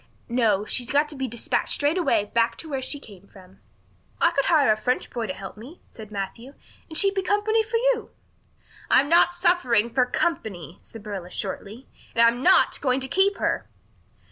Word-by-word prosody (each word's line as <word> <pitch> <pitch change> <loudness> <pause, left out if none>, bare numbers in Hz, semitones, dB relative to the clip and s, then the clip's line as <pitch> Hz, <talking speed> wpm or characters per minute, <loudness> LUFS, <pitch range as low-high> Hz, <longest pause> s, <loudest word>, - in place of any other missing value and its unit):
No, 220 -4 +1
she's 245 +2 -1
got 290 +1 +2
to 300 - -8
be 265 -1 -3
despatched 235 -1 -2
straight 310 +5 0
way 205 - +2
back 230 +2 0
to 325 - -9
where 275 -3 -3
she 290 +2 -4
came 200 -7 -15
from." 185 - -18 0.6
"I 335 - +4
could 275 -4 0
hire 295 -9 +4
a - - +3
French 250 +4 -2
boy 235 -2 -3
to 185 - -3
help 195 +1 -9
me," 260 +11 -12
said 220 -2 -11
Matthew, 215 +6 -6 0.3
"and 315 - -3
she'd 395 +2 +4
be 390 - -1
company 415 +3 +1
for 440 +1 -1
you." - - 0 0.8
"I'm 280 - +4
not 340 +1 +5
suffering 300 - +1
for 250 -2 +2
company," 185 - -3
said 225 -2 -13
Marilla 195 -4 -6
shortly. 205 +6 -5 0.3
"And 230 - +5
I'm 235 +2 +2
not 370 +7 +4
going 255 -2 +1
to 265 - 0
keep 390 +6 +2
her." - - -2
255 Hz, 195 wpm, -24 LUFS, 215-335 Hz, 0.8 s, not